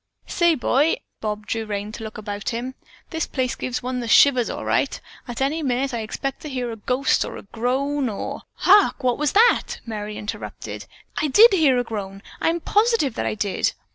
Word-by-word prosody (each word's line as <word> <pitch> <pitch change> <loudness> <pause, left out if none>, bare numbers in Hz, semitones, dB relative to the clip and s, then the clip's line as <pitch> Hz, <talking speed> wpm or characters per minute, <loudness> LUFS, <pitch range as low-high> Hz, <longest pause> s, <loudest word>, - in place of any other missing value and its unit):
"Say, 345 -2 +2
boy!" 290 - +2 0.2
Bob 210 -1 -4
drew 225 0 -3
rein 205 0 -4
to 225 - -8
look 220 - -7
about 205 -1 -4
him. 245 +2 -4 0.4
"This 320 -2 -2
places 255 -2 -1
gives 250 0 -4
one 250 0 -2
the 235 - -4
shivers, 250 +1 +5
all - - -5
right! - - 0 0.3
At 240 +1 -5
any 305 +4 0
minute 265 -1 -1
I 235 - -1
expect 265 +5 -4
to 305 - -7
hear 250 -3 -3
a - - -5
ghost 250 +5 +1 0.3
groan 265 +3 0
or 205 - -5
" - - -53
"Hark! 395 -6 +5
What 250 0 +1
was 300 -1 +1
that?" 460 +4 +3
Merry 210 -2 -5
interrupted. 210 - -6 0.3
"I 305 - +1
did 425 - +7
hear 300 -8 +4
a 245 - +1
groan! 200 -4 -6 0.2
I - - +3
am 335 +1 -1
positive 420 - +2
that - - -2
I - - -1
did." 200 -2 0
250 Hz, 200 wpm, -23 LUFS, 220-290 Hz, 0.4 s, did